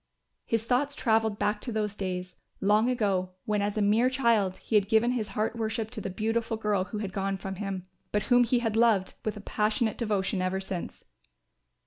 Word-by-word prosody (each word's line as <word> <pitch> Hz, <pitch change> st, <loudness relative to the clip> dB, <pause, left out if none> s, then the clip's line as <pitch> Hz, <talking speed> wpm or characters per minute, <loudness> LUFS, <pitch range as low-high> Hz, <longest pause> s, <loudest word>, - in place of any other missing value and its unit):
His 225 Hz, -1 st, +1 dB
thoughts 260 Hz, +5 st, +1 dB
travelled 220 Hz, -5 st, +2 dB
back 210 Hz, 0 st, 0 dB
to 245 Hz, -, -4 dB
those 210 Hz, -2 st, -1 dB
days, 185 Hz, -2 st, -4 dB, 0.2 s
long 210 Hz, +4 st, +3 dB
ago, 195 Hz, -7 st, 0 dB
when 210 Hz, -1 st, +1 dB
as 205 Hz, +1 st, -1 dB
a 210 Hz, -, +2 dB
mere 220 Hz, +5 st, +4 dB
child 230 Hz, -8 st, +2 dB
he -, -, -9 dB
had 205 Hz, -2 st, +4 dB
given 225 Hz, +2 st, +4 dB
his 230 Hz, -4 st, -1 dB
heart 215 Hz, +2 st, 0 dB
worship 220 Hz, 0 st, -2 dB
to 235 Hz, -4 st, -5 dB
the 195 Hz, -, -3 dB
beautiful 225 Hz, +3 st, -1 dB
girl 210 Hz, -3 st, 0 dB
who 200 Hz, +3 st, -6 dB
had 200 Hz, -3 st, -4 dB
gone 195 Hz, 0 st, -1 dB
from 195 Hz, 0 st, -6 dB
him, 195 Hz, -2 st, -4 dB, 0.3 s
but 210 Hz, -1 st, +1 dB
whom 245 Hz, -1 st, +5 dB
he 245 Hz, +1 st, +2 dB
had 220 Hz, -1 st, 0 dB
loved 225 Hz, -5 st, +3 dB
with 215 Hz, -1 st, -2 dB
a -, -, -7 dB
passionate 215 Hz, +2 st, 0 dB
devotion 205 Hz, -4 st, 0 dB
ever 185 Hz, +1 st, 0 dB
since. 190 Hz, -2 st, -6 dB
210 Hz, 200 wpm, -28 LUFS, 195-225 Hz, 0.3 s, whom